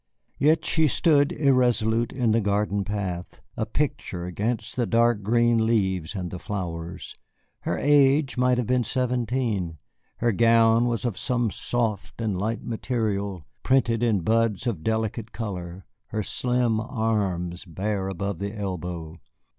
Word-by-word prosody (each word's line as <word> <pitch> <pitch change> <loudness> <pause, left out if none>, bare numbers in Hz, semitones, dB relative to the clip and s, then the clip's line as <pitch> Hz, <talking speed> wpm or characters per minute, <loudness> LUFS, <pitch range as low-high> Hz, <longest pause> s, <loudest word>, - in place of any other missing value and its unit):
Yet 155 +3 +3
she 160 -1 +3
stood 145 0 +3
irresolute 120 -5 +2
in 125 -4 +1
the 115 +1 +3
garden 100 0 0
path, 95 -4 -4 0.2
a 110 - -2
picture 120 -9 -2
against 105 +6 -2
the 120 -3 0
dark 115 -2 +3
green 115 +2 +3
leaves 95 -6 0
and 90 -3 -4
the 90 - -6
flowers. 90 -3 -5 0.5
Her - - -2
age 140 0 +4
might 125 0 +2
have 125 - 0
been 125 +2 +2
seventeen. 120 -8 -1 0.4
Her 120 0 +2
gown 115 +1 +4
was 120 0 -1
of 115 -6 -2
some 120 -3 0
soft 110 0 -2
and 110 -4 -1
light 110 +5 -2
material 100 - -2 0.2
printed 120 -4 +2
in 110 -6 +2
buds 115 +1 +1
of 100 -10 -2
delicate 110 0 -2
color, 95 -4 -6 0.2
her 110 0 -2
slim 120 0 +1
arms 100 -7 -1
bare 95 +3 -2
above 95 -1 -3
the 100 +2 -4
elbow. 90 -4 -5
110 Hz, 140 wpm, -25 LUFS, 95-120 Hz, 0.5 s, age